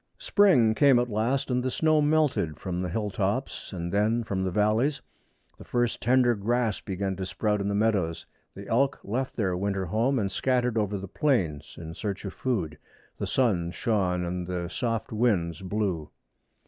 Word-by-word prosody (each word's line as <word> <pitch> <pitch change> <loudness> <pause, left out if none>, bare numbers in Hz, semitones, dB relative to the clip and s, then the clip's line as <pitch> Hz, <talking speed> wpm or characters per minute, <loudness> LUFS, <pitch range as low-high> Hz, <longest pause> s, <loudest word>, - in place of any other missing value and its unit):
Spring 160 - +4
came 140 +1 +5
at 120 -1 0
last, 120 +6 0
and 125 0 +1
the 130 - -1
snow 155 +3 +2
melted 145 - +1
from 90 -2 -3
the 90 - -2
hill 105 +3 -2
tops 100 +7 -2
and 85 -3 -4
then 110 +3 +2
from 95 -3 -2
the 95 - 0
valleys. 110 +9 +1 0.6
The - - -9
first 120 -1 -1
tender 125 +1 +4
grass 115 +1 0
began 95 -1 -3
to 95 - -3
sprout 105 0 0
in 100 - -2
the 100 - 0
meadows. 100 -6 0 0.3
The 100 +1 -9
elk 135 +4 +1
left 130 +6 -3
their 95 -5 0
winter 100 0 -1
home 115 +10 +1
and 100 -4 -1
scattered 125 +2 +1
over 105 -2 0
the 100 +1 -6
plains 90 - 0
in 80 -1 -7
search 100 +2 -4
of 95 - -5
food. 85 -13 -2 0.4
The - - -2
sun 100 -10 +1
shone 90 -3 0
and 90 0 -3
the 90 -2 -3
soft 115 +3 -2
winds 100 -8 +1
blew. 95 -5 -2
105 Hz, 180 wpm, -27 LUFS, 95-125 Hz, 0.6 s, came